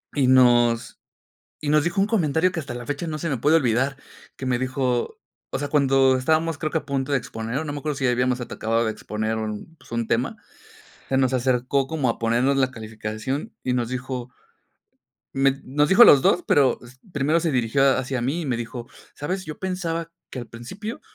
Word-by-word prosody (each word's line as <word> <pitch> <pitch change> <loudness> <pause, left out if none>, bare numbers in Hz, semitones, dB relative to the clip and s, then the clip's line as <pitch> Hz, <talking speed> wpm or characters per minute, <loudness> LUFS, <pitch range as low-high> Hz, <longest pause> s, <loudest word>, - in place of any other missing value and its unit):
Y 140 -3 +2
nos 120 -2 +4 0.6
y 150 - -2
nos 150 -1 +4
dijo 175 +4 0
un 195 - +3
comentario 180 -4 +1
que 170 - -3
hasta 135 -4 -7
la 120 0 -6
fecha 145 +4 -3
no 155 -1 -4
se 165 - -3
me 135 - -1
puede 150 +7 +4
olvidar, 130 -1 +1 0.4
que - - -7
me 125 -1 +1
dijo, 130 -1 -1 0.3
o - - -2
sea, 145 +1 -3
cuando 135 -2 +4
estábamos 160 +3 +1
creo 155 -1 -2
que 160 - +1
a - - -10
punto 140 0 -2
de 140 - +3
exponer, 115 0 -5
o 160 - -3
no 150 - -4
me 145 - -4
acuerdo 150 0 -3
si 135 - 0
habíamos 125 +1 +1
atacado 115 -1 -1
de 110 - 0
exponer 110 +1 -3
un, 110 +8 -5
pues, - - -20
un 115 -1 -2
tema, - - 0 0.7
se 135 - 0
nos 130 -1 +2
acercó 130 +1 +1
como 150 -4 -1
a - - -4
ponernos 120 +4 +2
la 130 -1 +1
calificación 110 +4 -5
y 125 - -1
nos 120 -2 0
dijo, 125 0 -5 1.0
me 135 0 +2
nos 145 +3 +1
dijo 195 +5 +8
a - - +9
los 140 - +8
dos, 175 +5 +3
pero 140 -3 +3
s 125 +2 -15
primero 150 +3 +1
se 165 -1 0
dirigió 130 +2 +2
hacia 130 -1 -2
mí 140 +8 -1
y - - -4
me 130 -4 0
dijo: 120 +1 -6 0.3
"¿Sabes?, 185 +6 -4
yo 155 - -8
pensaba 170 -3 -3 0.2
que 130 - -6
al 120 - -8
principio 160 - -8
135 Hz, 215 wpm, -23 LUFS, 120-150 Hz, 1.0 s, a